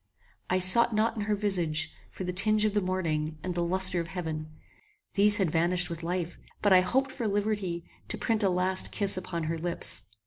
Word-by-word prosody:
I 185 Hz, -, +2 dB
sought 215 Hz, +5 st, +4 dB
not 225 Hz, +2 st, +1 dB
in 210 Hz, -2 st, -3 dB
her 210 Hz, 0 st, 0 dB
visage, 175 Hz, -7 st, -1 dB, 0.2 s
for -, -, -8 dB
the 180 Hz, 0 st, -3 dB
tinge 215 Hz, +3 st, +2 dB
of 215 Hz, -, 0 dB
the 205 Hz, -, +1 dB
morning, 160 Hz, -5 st, -2 dB
and 185 Hz, -, -3 dB
the 175 Hz, -, -2 dB
lustre 185 Hz, +1 st, +3 dB
of 170 Hz, -, -4 dB
heaven. 160 Hz, -4 st, -5 dB, 0.6 s
These 205 Hz, +1 st, +5 dB
had 190 Hz, -7 st, 0 dB
vanished 175 Hz, +2 st, +2 dB
with 165 Hz, 0 st, -6 dB
life; 175 Hz, 0 st, -4 dB, 0.2 s
but 205 Hz, -2 st, +4 dB
I 185 Hz, -, +7 dB
hoped 265 Hz, +9 st, 0 dB
for 235 Hz, -4 st, -3 dB
liberty 200 Hz, -4 st, -2 dB, 0.2 s
to -, -, -2 dB
print 225 Hz, -1 st, 0 dB
a 200 Hz, -, +4 dB
last 185 Hz, +1 st, +2 dB
kiss 200 Hz, -2 st, 0 dB
upon 185 Hz, -2 st, -4 dB
her 160 Hz, +1 st, -3 dB
lips. 170 Hz, -, 0 dB
185 Hz, 205 wpm, -28 LUFS, 170-205 Hz, 0.6 s, I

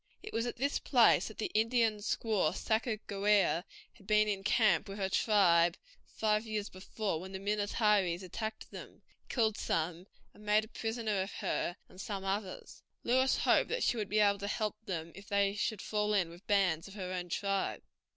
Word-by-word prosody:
It 430 Hz, -, -8 dB
was 230 Hz, +1 st, 0 dB
at -, -, -4 dB
this 280 Hz, +4 st, 0 dB
place 245 Hz, -4 st, +4 dB
that 220 Hz, -, -10 dB
the 220 Hz, -, -3 dB
Indian 225 Hz, 0 st, +2 dB
squaw 205 Hz, -5 st, 0 dB
Sacajawea 210 Hz, -5 st, +1 dB, 0.3 s
had 195 Hz, -, -20 dB
been 215 Hz, 0 st, +4 dB
in 200 Hz, -2 st, -2 dB
camp 215 Hz, -1 st, +3 dB
with 195 Hz, -, -6 dB
her 190 Hz, -2 st, -1 dB
tribe 175 Hz, -5 st, +3 dB, 0.3 s
five 215 Hz, 0 st, 0 dB
years 215 Hz, -1 st, -3 dB
before 190 Hz, -1 st, -4 dB
when 190 Hz, +1 st, -9 dB
the 190 Hz, -, -4 dB
Minnetarees 205 Hz, -3 st, +1 dB
attacked 220 Hz, +4 st, -6 dB
them, -, -, -11 dB, 0.3 s
killed 220 Hz, -4 st, +1 dB
some, 170 Hz, +3 st, -2 dB, 0.3 s
and 210 Hz, -, -16 dB
made 210 Hz, +1 st, +3 dB
a -, -, -18 dB
prisoner 225 Hz, -4 st, -2 dB
of 190 Hz, -, -4 dB
her 175 Hz, -, -2 dB
and 185 Hz, -, -11 dB
some 195 Hz, -2 st, -5 dB
others. 195 Hz, -1 st, -4 dB, 0.2 s
Lewis 260 Hz, +2 st, +3 dB
hoped -, -, +3 dB
that -, -, -1 dB
she -, -, +2 dB
would 215 Hz, -3 st, -3 dB
be 215 Hz, -, 0 dB
able 200 Hz, -1 st, +4 dB
to 200 Hz, -, -4 dB
help 210 Hz, 0 st, -1 dB
them 165 Hz, -3 st, -4 dB
if 195 Hz, +1 st, -12 dB
they 200 Hz, -1 st, +2 dB
should 210 Hz, 0 st, -2 dB
fall 210 Hz, 0 st, 0 dB
in 180 Hz, -4 st, +1 dB
with 175 Hz, +4 st, -15 dB
bands 185 Hz, -5 st, +2 dB
of 195 Hz, -, -12 dB
her 185 Hz, -2 st, -5 dB
own 180 Hz, -1 st, -4 dB
tribe. 195 Hz, +2 st, -1 dB
205 Hz, 190 wpm, -32 LUFS, 190-220 Hz, 0.3 s, place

